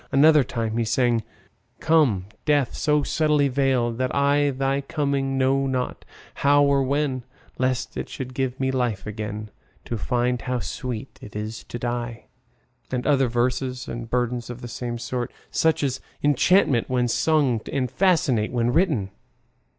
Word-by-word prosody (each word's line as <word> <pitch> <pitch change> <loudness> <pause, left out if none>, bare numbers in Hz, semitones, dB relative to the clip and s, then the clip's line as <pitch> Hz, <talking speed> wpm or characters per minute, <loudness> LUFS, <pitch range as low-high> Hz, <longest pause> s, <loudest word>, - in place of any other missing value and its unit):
Another 150 +1 +6
time 115 -2 -3
he 120 - +2
sang: 115 +1 +2 0.6
Come 145 - +3 0.2
Death, 145 -4 +2
so 150 -1 +2
subtly 150 -2 +2
veiled 125 -3 +1
that 130 0 -1
I 145 +1 +3
Thy 135 +1 0
coming 140 -2 -1
know 135 +1 +2
not, 130 -1 -2 0.4
how 145 +1 +5
or 140 -1 +3
when, 135 -1 0 0.4
Lest 130 -1 -1
it - - -4
should 130 -1 -6
give 130 -1 -2
me 130 0 +1
life 125 -6 -1
again 105 0 -5 0.3
To 115 - -3
find 125 +2 0
how 125 0 -2
sweet 120 -1 -5
it 105 - -11
is 110 +1 -5
to - - -6
die. 120 -1 -4 0.6
—and 125 -1 -2
other 135 -3 +3
verses 125 +2 -1
and 115 -1 -6
burdens 120 -1 -1
of 120 0 -7
the 120 - -6
same 120 0 -4
sort, 120 0 -3 0.2
such 160 -2 +2
as 130 -2 -1 0.2
enchant 145 - +3
when 125 -1 +1
sung 135 -3 +2
and 130 -3 -1
fascinate 155 - +2
when 120 0 +1
written. 150 - +1
130 Hz, 155 wpm, -24 LUFS, 120-140 Hz, 0.6 s, Another